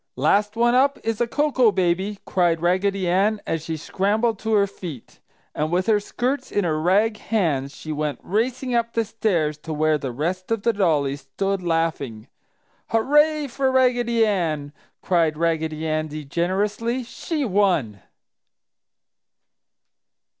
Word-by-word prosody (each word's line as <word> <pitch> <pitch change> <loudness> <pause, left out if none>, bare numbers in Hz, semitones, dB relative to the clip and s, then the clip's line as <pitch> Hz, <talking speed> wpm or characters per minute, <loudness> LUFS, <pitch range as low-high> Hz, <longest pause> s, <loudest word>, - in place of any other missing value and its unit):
"Last 210 +1 +2
one 240 +1 +3
up 275 +2 +3
is 225 0 -2
a 240 - +2
Cocoa 260 -3 +2
baby!" 190 +2 0
cried 175 -3 +1
Raggedy 185 +2 +1
Ann, 200 +5 +2
as 165 -1 -2
she 160 -1 -4
scrambled 210 +7 0
to 220 0 -2
her 200 -1 +4
feet. 175 - -9 0.3
And 155 +1 -2
with 180 +1 +1
her 215 -1 +3
skirts 250 +6 -3
in 205 - +1
her 155 -3 0
rag 210 +6 +2
hands 150 -12 -1
she 155 - -7
went 150 -1 -2
racing 245 +5 -1
up 235 -1 0
the 230 -1 +1
stairs 175 -9 -1
to 160 - -8
where 155 0 +1
the 135 -3 -4
rest 175 +8 -3
of 225 -3 -1
the 235 - +2
dollies 145 -8 +1
stood 195 +8 -2
laughing. 165 -10 -2 0.6
"Hurrah, 295 +6 +3
for 265 +1 0
Raggedy 245 -3 +3
Ann!" 155 -8 -1 0.3
cried 165 -4 +2
Raggedy 160 -1 -1
Andy 155 -1 -3
generously. 205 - -1
"She 295 +5 -3
won!" 180 - +1
190 Hz, 145 wpm, -23 LUFS, 155-225 Hz, 0.6 s, her